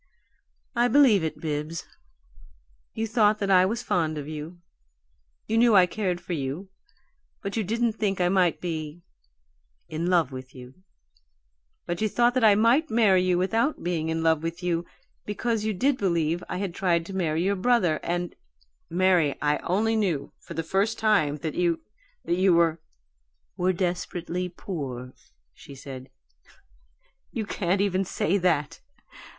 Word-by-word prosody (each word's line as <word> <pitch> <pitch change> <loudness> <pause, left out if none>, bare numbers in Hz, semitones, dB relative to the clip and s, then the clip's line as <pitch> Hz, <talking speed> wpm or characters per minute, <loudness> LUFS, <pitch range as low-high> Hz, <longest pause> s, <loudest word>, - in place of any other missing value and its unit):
"I 240 +1 +3
believe 245 - +5
it, 160 - -3
Bibbs. 155 +1 -4 1.1
You 225 - -1
thought 215 -1 +3
that 200 -2 -1
I 185 0 +6
was 235 +4 -3
fond 160 -7 0
of 145 -1 -5
you; 155 +3 -7 0.9
you 225 +1 +1
knew 235 -2 +5
I 185 -2 +7
cared 180 -2 -2
for 175 0 -6
you 150 +6 -4 0.7
but 200 - -4
you 225 - 0
didn't 230 +3 0
think 205 -3 -1
I 180 - +3
might 180 -2 +2
be 160 -1 -5 0.8
in 165 +2 -3
love 170 -6 +2
with 130 0 -9
you. 125 0 -11 1.1
But 175 +2 -3
you 215 - +1
thought 240 +3 +3
that 255 -2 +1
I 210 -2 +7
might 240 +9 +3
marry 210 -5 +4
you 180 -1 +2
without 225 +10 0
being 165 -2 -1
in 160 0 -1
love 160 -1 +3
with 165 +2 -5
you 170 -1 -1 0.4
because 215 +1 -2
you 220 - +1
did 255 +7 +1
believe 170 -3 0
I - - -3
had 190 -2 -3
tried 170 -3 +1
to 195 - -8
marry 165 -3 0
your 200 +2 +1
brother, 185 -7 +2
and 175 0 -3 0.3
" - - -46
"Mary, 175 -6 +3
I 150 0 +1
only 220 +5 0
knew 185 -10 -1
for 170 - -10
the 165 - -2
first 195 +7 0
time 195 -10 +2
that 155 -3 -2
you 170 -2 +1 0.5
that 175 - 0
you 185 -1 +4
were 165 -1 +3 0.4
" - - -49
"Were 185 +1 +1
desperately 180 0 -3
poor," 135 -9 -6 0.4
she 140 - -13
said. 130 -1 -9 1.2
"You 220 - -3
can't 190 -1 0
even 195 -1 +1
say 190 +1 0
that! 160 -6 0
180 Hz, 165 wpm, -26 LUFS, 160-205 Hz, 1.2 s, I